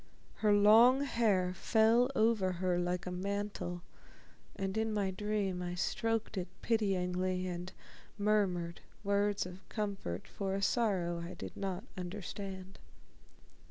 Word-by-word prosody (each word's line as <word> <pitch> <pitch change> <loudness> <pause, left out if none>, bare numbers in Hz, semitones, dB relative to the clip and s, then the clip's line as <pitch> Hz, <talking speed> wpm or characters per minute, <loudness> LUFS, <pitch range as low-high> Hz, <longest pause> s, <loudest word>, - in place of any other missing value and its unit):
Her 210 -1 +3
long 220 +6 +7
hair 210 -9 +2
fell 225 +6 +3
over 215 -4 +3
her 180 0 0
like 180 0 -1
a 180 - -4
mantle, 195 -2 -3 0.7
and 195 0 -3
in 220 0 0
my 200 -3 0
dream 200 -2 -1
I 175 0 -3
stroked 225 +2 -1
it 180 - -4 0.2
pityingly 185 -4 0
and 180 0 -4 0.5
murmured 195 -5 +1 0.2
words 200 0 +1
of 180 +1 -8
comfort 200 - -3
for 195 -1 -3
a 195 - -2
sorrow 190 -7 +1
I 170 +1 -6
did 95 -1 -8
not 195 0 -3
understand.... 190 0 -6
195 Hz, 125 wpm, -33 LUFS, 180-210 Hz, 0.7 s, long